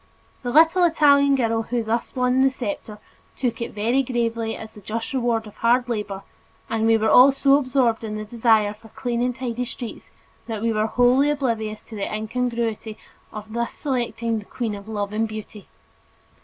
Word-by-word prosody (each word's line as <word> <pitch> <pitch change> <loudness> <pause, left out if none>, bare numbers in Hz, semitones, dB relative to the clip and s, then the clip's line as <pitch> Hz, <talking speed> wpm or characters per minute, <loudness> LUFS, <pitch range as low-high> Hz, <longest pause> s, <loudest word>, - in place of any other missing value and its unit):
The 245 - -4
little 325 +7 +5
Italian 285 -4 +5
girl 230 -3 +1
who 235 +1 -2
thus 225 +2 -2
won 250 0 +2
the 270 - +5
scepter 260 -4 -5 0.4
took 240 -3 -2
it 235 - -2
very 235 +6 +2
gravely 230 -3 -2
as 220 0 -10
the 210 - -13
just 225 +5 -4
reward 235 -3 0
of 210 - -13
hard 245 +2 +2
labor, 210 -4 -4 0.5
and 225 0 +1
we 225 0 +5
were 220 0 +1
all 260 +3 +8
so 275 +1 +4
absorbed 255 -4 +1
in 215 -1 -4
the 215 0 -5
desire 220 -2 +2
for 220 +1 -17
clean 240 +1 -3
and 250 0 0
tidy 250 -1 -3
streets 240 -1 -8 0.4
that 220 -2 -4
we 230 -1 +1
were 215 0 +1
wholly 250 +5 +3
oblivious 230 -7 -2
to 225 - -11
the 200 - -3
incongruity 225 0 -2 0.3
of 215 0 -9
thus 235 0 -2
selecting 235 -4 -2
"the 205 - -11
queen 230 -1 -4
of 200 0 -9
love 205 -1 -3
and 220 +1 0
beauty." 215 -1 -9
230 Hz, 185 wpm, -23 LUFS, 220-250 Hz, 0.5 s, all